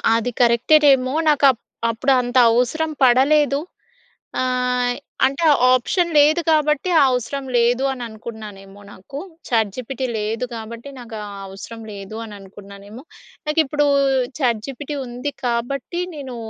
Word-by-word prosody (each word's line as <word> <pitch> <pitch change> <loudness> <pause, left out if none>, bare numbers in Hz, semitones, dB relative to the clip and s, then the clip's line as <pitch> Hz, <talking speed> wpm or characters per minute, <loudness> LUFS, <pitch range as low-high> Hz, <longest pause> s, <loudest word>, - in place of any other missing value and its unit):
అది 230 +2 -1
కరెక్టేటేమో 255 +2 +4 0.2
నాకప్ప్ 275 -5 +4 0.3
అప్పుడు 230 +4 0
అంత 245 +1 -2
అవసరం 250 +7 +1
పడలేదు. 275 +3 +4 0.8
ఆహ్, 250 -1 0 0.3
అంటే 275 +5 0 0.3
ఆప్షన్ 340 +8 +1
లేదు 300 +3 +5
కాబట్టి 305 +1 +2
ఆ - - +6
అవసరం 255 +3 -3
లేదు 240 +2 +2
అని 250 -2 -6
అనుకున్నానేమో 210 -3 -10
నాకు. 235 +10 -9 0.3
చాట్‌జిపిటి 235 +3 -1
లేదు 220 +3 -2
కాబట్టి 230 +4 -8
నాకు 230 -2 -9
ఆ - - -8 0.2
అవసరం 210 +4 -10
లేదు 200 +1 -9
అని 215 -2 -9
అనుకున్నానేమో. 200 +4 -12 0.4
నాకిప్పుడు 300 -1 +1 0.5
చాట్‌జిపిటి 260 +3 -2
ఉంది 250 +4 -5
కాబట్టి, 245 +8 -2
నేను 265 -4 -7
250 Hz, 115 wpm, -20 LUFS, 225-280 Hz, 0.8 s, ఆ